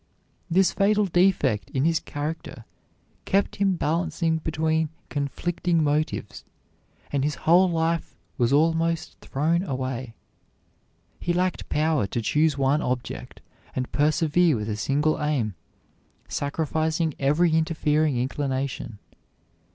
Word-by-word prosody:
This 185 +2 +4
fatal 210 +1 +2
defect 175 - +2
in 135 +1 0
his 165 0 +3
character 150 +2 -6 0.6
kept 200 0 +1
him 195 -2 +2
balancing 165 0 0
between 160 0 0 0.2
conflicting 165 +3 -1
motives; 150 +1 -1 0.7
and 140 -2 0
his 150 +1 0
whole 180 +3 +6
life 165 -1 -1 0.2
was 120 -2 +1
almost 165 +2 +1
thrown 160 +5 0
away. 130 -7 -4 1.0
He 175 - -1
lacked 180 0 -1
power 155 -8 +1
to 120 - -2
choose 150 +6 +2
one 140 +2 +2
object 125 -1 -4 0.3
and 130 -1 -3
persevere 155 +2 +3
with 105 -1 -3
a 105 - -1
single 145 +8 0
aim, 140 -9 0 0.7
sacrificing 160 +2 -1
every 155 +5 +3
interfering 155 -3 +1
inclination. 130 -3 -2
155 Hz, 110 wpm, -25 LUFS, 140-165 Hz, 1.0 s, whole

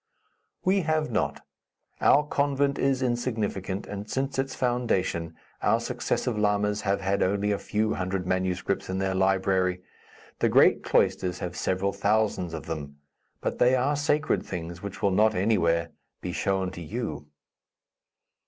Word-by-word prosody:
"We 190 +1 +3
have 155 -4 0
not. 110 - -1 0.6
Our 145 - +5
convent 140 -1 +1
is 135 -1 +1
insignificant, 110 -6 -2
and 100 +1 -7
since 135 0 -2
its 135 0 -1
foundation 95 -10 0 0.3
our - - +3
successive 115 -4 -2
lamas 105 0 +1
have 100 0 0
had 100 +1 0
only 100 +2 +1
a 100 - 0
few 110 +1 0
hundred 95 0 -2
manuscripts 95 +1 -1
in 95 - -1
their 95 0 0
library. 95 -1 +1 0.6
The - - +3
great - - +5
cloisters 90 -1 +1
have 90 0 -5
several 95 +1 0
thousands 100 -5 0
of 80 -1 -7
them; 75 -3 -6 0.4
but - - -2
they 125 +1 +5
are 135 +3 +1
sacred 150 +1 +1
things 85 0 -6
which 100 0 -7
will 100 - +4
not, 105 +4 +3
anywhere, 85 -5 +2 0.3
be 90 - -4
shown 95 +1 0
to 85 - -8
you." 85 -5 -5
100 Hz, 145 wpm, -27 LUFS, 90-120 Hz, 0.6 s, Our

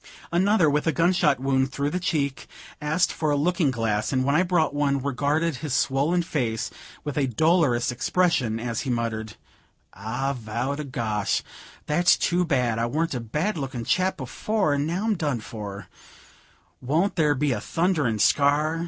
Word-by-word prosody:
Another, 185 0 +3
with 150 +2 +1
a - - +4
gun 170 +3 +2
shot 150 -7 +2
wound 135 0 +1
through 140 +2 -2
the 180 - -1
cheek, 145 -6 -2 0.3
asked 155 +4 +1
for 155 - -1
a 145 - +2
looking 165 +1 +1
glass, 115 -4 -1
and 130 -1 +1
when 140 - +2
I 160 - +4
brought 175 -5 +1
one, 145 -1 +1
regarded 140 +3 0
his 145 -2 -3
swollen 145 +8 +1
face 120 -10 -2 0.3
with 145 0 -3
a 135 - +1
dolorous 140 -2 +2
expression, 125 -4 +1
as 115 -1 -3
he 135 - -4
muttered 110 -3 -2 0.6
"I 115 +7 -3
vow 120 +3 -3
to 150 +1 -5
gosh, 110 -7 -1 0.4
that's 175 +4 +3
too 180 +1 +1
bad! 125 -8 0
I 115 - +1
warn't 160 +6 -1
a 125 - -2
bad 150 - -2
looking 130 -4 -4
chap 185 +1 +1
before, 155 - -1
and 145 +1 0
now 175 +5 -2
I'm 225 - +2
done 145 -7 -1
for; 105 -3 -8 0.9
won't 160 +10 0
there 150 -3 +2
be 145 +1 0
a 110 -4 -2
thunderin' 160 - 0
scar? 145 +7 +2
145 Hz, 175 wpm, -25 LUFS, 120-165 Hz, 0.9 s, a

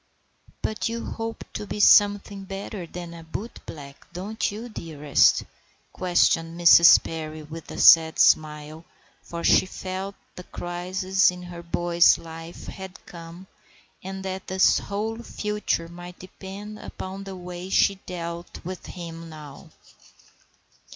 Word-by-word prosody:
"But 215 +1 -1
you 230 0 -4
hope 225 0 -5
to 210 - -5
be 210 - -5
something 205 -1 +5
better 195 -1 -6
than 175 0 -8
a 165 -1 -10
bootblack, 160 -6 -8
don't 195 +6 -3
you, 220 +4 -7
dearest?" 155 - +2 0.5
questioned 170 -2 +1
Mrs. 170 -1 +8
Perry, 155 -1 -6
with 160 +2 -10
a - - -7
sad 160 -1 +7
smile, 155 +1 +2 0.4
for 170 0 -7
she - - +5
felt 190 +1 -5 0.2
that - - -33
the 180 - -10
crisis 185 +2 +1
in 180 0 -6
her 175 -1 -8
boy's 170 0 +4
life 165 +1 -10
had 190 0 -9
come, 170 +2 -11 0.6
and 190 +1 -6
that 190 0 -5
his 190 0 +4
whole 220 +3 -4
future 210 -7 -2
might 175 +1 -10
depend 195 +3 -9
upon 190 +1 -7
the 195 -1 -7
way 180 0 -7
she 200 - +4
dealt 170 -1 -6
with 185 0 -7
him 165 -2 -8
now. 150 -3 -11
180 Hz, 135 wpm, -25 LUFS, 165-195 Hz, 0.6 s, Mrs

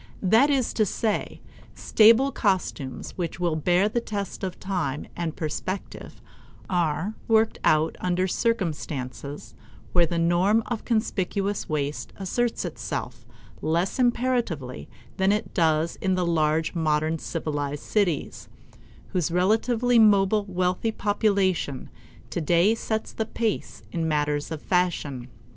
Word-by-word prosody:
That 225 +9 +5
is 270 -4 +1
to 220 - +2
say, 215 +1 -2 0.3
stable 230 +5 +5
costumes 185 - -1
which 170 0 -3
will 170 -3 +1
bear 180 +5 +2
the 235 +2 -1
test 200 -5 -5
of 185 -1 -4
time 175 -8 -2
and 165 -2 -3
perspective 175 +5 -5 0.4
are 175 +2 0
worked 220 0 +3
out 155 +1 +3
under 180 +1 +1
circumstances 150 - -3 0.4
where 175 -2 +4
the 170 - -2
norm 175 +6 +3
of 235 -3 -4
conspicuous 205 -3 -1
waste 145 -1 -3
asserts 230 +5 -1
itself - - -5 0.3
less 170 +8 0
imperatively 240 - 0 0.3
than 190 +1 +3
it 210 +2 -1
does 160 -1 +1
in 190 -1 0
the 180 -1 0
large 160 -1 +1
modern 155 -1 0
civilized 145 -3 -3
cities, 190 -8 -1 0.6
whose 175 -4 0
relatively 225 +7 +2
mobile 205 -1 +4
wealthy 185 +3 0
population 200 - 0 0.4
today 175 +5 +3
sets 220 -1 -3
the 220 - -2
pace 225 -1 -3
in 165 -2 -1
matters 150 -1 0
of 160 -2 -6
fashion. 155 -9 0
180 Hz, 120 wpm, -25 LUFS, 160-215 Hz, 0.6 s, That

